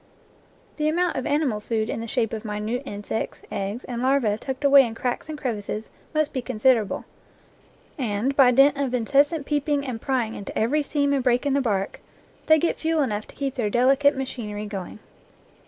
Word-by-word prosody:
The 305 0 +1
amount 350 +2 +1
of 260 - -2
ani 295 +2 +2
mal 220 -6 -1
food 220 0 -2
in - - -3
the 230 - -5
shape 230 -2 -1
of 220 0 -4
minute 215 +3 -3
insects, 205 +2 -4
eggs, 200 +5 -3
and 240 -1 -5
larvae 260 -5 +2
tucked 265 +5 -5
away 280 -1 +8
in 230 -2 -4
cracks 250 +6 -3
and 310 - -5
crevices 220 -5 -4 0.2
must 310 -1 0
be 260 - -1
considerable, 225 -2 +1 0.9
and, 240 +2 -1
by 270 -3 +7
dint 275 +3 +5
of 265 -3 0
incessant 280 +5 +2
peeping 290 -1 0
and 240 -4 -5
prying 245 -5 -1
into 200 - -7
every 270 +8 +2
seam 285 0 0
and 270 -2 +1
break 250 +1 +2
in 280 - +1
the 280 - +2
bark, 200 -6 -1 0.5
they 315 - +7
get 335 +2 0
fuel 320 -2 +1
enough 215 -4 -3
to - - -15
keep 275 -2 -2
their 230 -6 -1
delicate 270 +5 +4
machinery 215 -6 -4
going. 195 -3 -6
255 Hz, 190 wpm, -24 LUFS, 220-280 Hz, 0.9 s, away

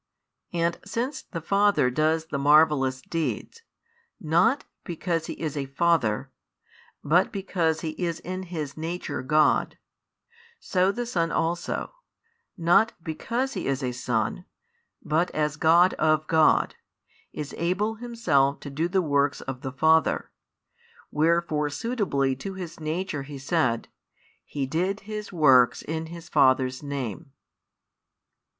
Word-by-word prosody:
And 170 0 0
since 235 +7 -3
the 165 - -7
Father 200 -7 +3
does 155 +3 +1
the 140 -3 -4
marvellous 145 -3 +4
deeds, 165 - -3 0.6
not 180 - +2 0.2
because 165 -1 -2
He - - -4
is 155 -3 -3
a 140 -2 -3
Father, 135 -5 +1 0.7
but 175 +6 +3
because 175 -5 -1
He 160 - -3
is 170 -1 -2
in 185 +1 -5
His 155 -5 -4
Nature 160 -3 -4
God; 150 +4 +2 0.8
so 185 +1 +1
the 240 +3 -4
Son 170 -8 -1
also, 170 - -2 0.6
not 175 +7 +4
because 240 +12 -2
He - - -4
is 135 0 -1
a 125 - -1
Son, 120 +6 -2 0.6
but 165 +4 +1
as 150 -1 0
God 170 +4 +5
of 155 0 +2
God, 160 -1 +3 0.6
is 150 -1 -6
able 190 +6 0
Himself 220 - +1
to 145 - -7
do 155 +5 -1
the 185 0 +1
works 145 -2 +1
of 130 -1 -6
the 135 - -4
Father: 160 +3 +2 0.8
wherefore 155 -1 +1
suitably 145 - -1
to 190 +8 -6
His 175 -3 -7
Nature 160 0 -3
He 140 +1 -8
said 135 -5 0 0.6
He 140 -2 -3
did 180 +9 -1
His 210 +1 -6
works 135 -8 +4
in 160 +1 -4
His 170 0 -10
Father's 130 -2 +3
Name. 140 0 -5
160 Hz, 130 wpm, -26 LUFS, 140-180 Hz, 0.8 s, God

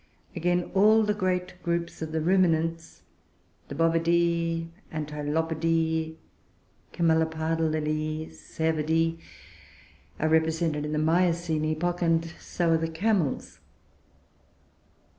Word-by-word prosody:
Again, 175 +1 0
all 215 +3 +5
the 210 0 +1
great 185 -2 -2
groups 170 -1 -2
of 160 -1 -4
the 160 0 -1
Ruminants, 165 -2 +1 0.6
the 140 - -7
Bovidoe, 165 +1 +1 0.2
Antilopidoe, 160 +1 -1 0.8
Camelopardalidoe, 160 -1 0
and - - -12
Cervidoe, 160 +1 -1 1.0
are 155 - +1
represented 160 -1 +1
in 150 - -4
the - - 0
Miocene 165 0 +1
epoch, 175 +3 -1
and 165 -1 +2
so 170 -2 -1
are 165 - +4
the 165 0 -2
Camels. 175 -3 -1
165 Hz, 100 wpm, -27 LUFS, 160-170 Hz, 1.0 s, all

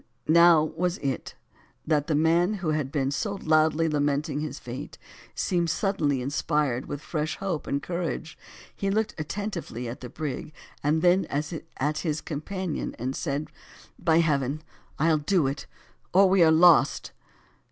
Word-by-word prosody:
Now 170 -1 +6
was 170 +4 -1
it, 135 -3 -4 0.5
that 150 -2 +1
the 155 - +1
man 170 +6 +3
who 185 -5 -3
had 150 -3 -1
been 135 -2 0
so 200 +9 -2
loudly 155 -2 +2
lamenting 145 0 0
his 155 0 -4
fate, 130 +5 -8 0.4
seemed 175 -3 0
suddenly 150 -10 0
inspired 140 -1 0
with 145 - -5
fresh 155 -1 -3
hope 185 -6 -3
and 140 0 -1
courage, 170 -2 -4 0.4
he 195 - -2
looked 215 +2 0
attentively 165 - -4
at 120 - -6
the 125 - -7
brig, 150 +1 -5 0.3
then 175 +6 +3
at 150 -1 -3
his 155 -3 -1
companion, 175 +3 -4
and 130 +3 -3
said 145 -1 -3 0.5
"by 165 -1 +4
heaven 145 -1 0 0.3
I'll 155 +1 +3
do 165 +1 +2
it, 135 +2 -3 0.5
or 195 +2 +6
we 190 0 +4
are 165 - +7
lost!" 165 +1 +5
155 Hz, 145 wpm, -26 LUFS, 145-175 Hz, 0.5 s, are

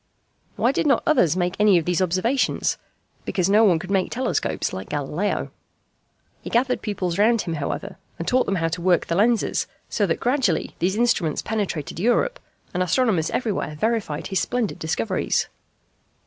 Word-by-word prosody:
Why 245 - +2
did 280 - 0
not 275 - +3
others 185 - +3
make 175 -1 0
any 210 -3 +5
of 165 - 0
these 180 +1 +1
observations? 185 +9 +1 0.4
Because 185 0 0
no 215 +2 +6
one 185 -6 +5
could 185 +4 -7
make 190 -2 +1
telescopes 255 +2 -1
like 95 +1 -6
Galileo. 150 +7 -2 0.9
He - - -7
gathered 250 +2 +1
pupils 190 -4 -2
round 225 +1 +4
him 170 - -4
however, 175 +6 -4 0.2
and 165 - -5
taught 255 0 +2
them 195 - 0
how 165 -2 0
to 170 +2 -4
work 175 -1 +3
the 170 - -2
lenses, 225 +4 +2 0.2
so 205 - +1
that 165 - -1
gradually 245 - 0
these 185 +3 +1
instruments 215 -10 +1
penetrated 195 -9 -3
Europe, 485 - +1 0.3
and 180 - -1
astronomers 185 -2 +2
everywhere 210 -10 -2
verified 220 -9 -1
his 190 - 0
splendid 240 +2 -2
discoveries. 160 -8 -1
195 Hz, 165 wpm, -23 LUFS, 170-235 Hz, 0.9 s, no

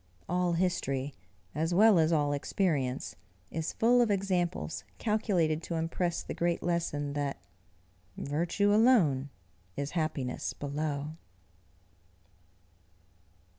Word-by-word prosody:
All 180 0 +1
history, 145 -6 -1 0.4
as 160 +4 0
well 210 -1 +6
as 160 +1 +3
all 145 -3 +2
experience, 140 - -1 0.4
is 160 0 -2
full 245 +2 +4
of 235 - +3
examples 185 -4 -1
calculated 185 -8 +1
to 170 - -4
impress 165 +2 -1
the - - -5
great 170 0 0
lesson 155 -4 -1
that 145 -1 -2 0.8
"VIRTUE 170 +8 +1
alone 190 - +4 0.5
is 140 0 -2
HAPPINESS 155 -6 -2
below." 145 +1 -3
165 Hz, 100 wpm, -30 LUFS, 145-180 Hz, 0.8 s, well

